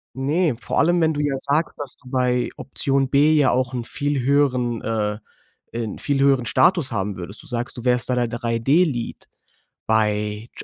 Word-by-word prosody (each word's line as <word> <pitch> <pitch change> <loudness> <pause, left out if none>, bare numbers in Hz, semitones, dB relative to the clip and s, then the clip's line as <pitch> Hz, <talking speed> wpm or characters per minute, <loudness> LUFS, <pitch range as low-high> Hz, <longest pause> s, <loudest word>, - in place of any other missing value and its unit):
Ne, 145 +3 +1
vor - - -2
allem, 175 +2 +3
wenn 160 -1 +2
du 145 - -2
ja 145 -2 0
sagst, 145 +4 -1
dass 140 -3 -5
du 125 - -16
bei 125 -1 +1
Option 135 0 0
B 145 +3 +4
ja 145 -4 +4
auch 130 0 0
'n 125 -2 -3
viel 145 +3 -2
höheren, 125 -3 +1
äh 105 -1 -2 0.5
ein 115 -3 -4
viel 140 -1 -1
höheren 135 -3 +3
Status 170 -1 +3
haben 100 -2 -2
würdest. 95 +4 -7
Du - - -14
sagst: 120 0 -3
„Du 120 - -7
wärst 125 0 +2
da 125 - +1
der 120 -1 +1
3D-Lead, 120 +4 0 0.6
bei 105 0 0
125 Hz, 180 wpm, -22 LUFS, 115-145 Hz, 0.6 s, B